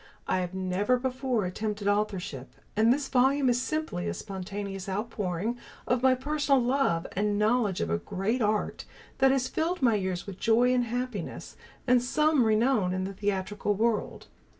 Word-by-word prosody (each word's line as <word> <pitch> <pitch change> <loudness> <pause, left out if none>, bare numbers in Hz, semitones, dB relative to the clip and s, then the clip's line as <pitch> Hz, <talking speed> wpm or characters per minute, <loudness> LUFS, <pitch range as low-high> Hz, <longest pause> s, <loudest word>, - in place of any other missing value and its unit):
I 185 - +1
have 180 0 -4
never 190 +6 +1
before 255 -3 -1
attempted 205 +2 -3
authorship, 195 -10 -2 0.2
and 220 +2 +4
this 275 +2 +1
volume 265 +1 +3
is 245 0 +2
simply 310 - -2
a 85 - -2
spontaneous 195 0 -6
outpouring 210 +1 -2 0.3
of 250 -1 +1
my 260 0 +5
personal 285 +1 +1
love 245 -9 +1
and 205 +1 0
knowledge 215 -2 +1
of 85 - -1
a 85 - +1
great 205 - -2
art 210 -1 0 0.3
that 270 0 +6
has 260 -1 +1
filled 335 +2 -2
my 235 -3 +5
years 185 -3 -2
with 195 -2 -8
joy 240 +2 +3
and 245 -1 +2
happiness, 240 -5 -4 0.3
and 250 -1 +4
some 300 +1 +2
renown 215 -4 +2
in 185 - -1
the 195 +1 -4
theatrical 205 +1 -1
world. 225 +1 -1
215 Hz, 165 wpm, -28 LUFS, 195-255 Hz, 0.3 s, that